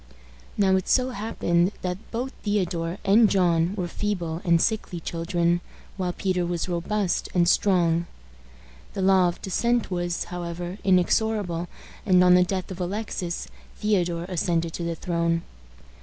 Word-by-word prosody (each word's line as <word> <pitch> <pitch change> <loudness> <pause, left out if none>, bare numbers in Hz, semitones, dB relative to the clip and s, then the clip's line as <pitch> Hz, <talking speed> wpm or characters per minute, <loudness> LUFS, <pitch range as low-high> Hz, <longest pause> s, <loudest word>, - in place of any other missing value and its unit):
Now 190 -2 +4
it 185 - -3
so 255 0 +3
happened 195 -4 0
that 180 +3 -4
both 245 +3 -3
Theodore 180 -4 -1
and 215 +2 +6
John 175 -1 +2
were 180 -4 -2
feeble 175 -4 -3
and 170 -1 +4
sickly 210 -3 -1
children, 170 +1 0 0.3
while 185 -2 -2
Peter 185 0 -1
was 175 0 -2
robust 180 +2 -1
and 175 -1 +4
strong. 170 -3 +3 0.9
The 195 - -2
law 190 -1 +5
of 175 - -4
descent 235 +3 0
was, 175 -1 -1
however, 175 +2 -6
inexorable, 185 -1 +1 0.4
and, 185 -4 +5
on 180 0 +6
the 180 - +6
death 185 0 -3
of 185 0 -6
Alexis, 180 -2 -3 0.3
Theodore 175 -5 0
ascended 170 -2 -1
to 175 - -4
the 170 0 -2
throne. 170 -1 -1
180 Hz, 140 wpm, -25 LUFS, 170-195 Hz, 0.9 s, and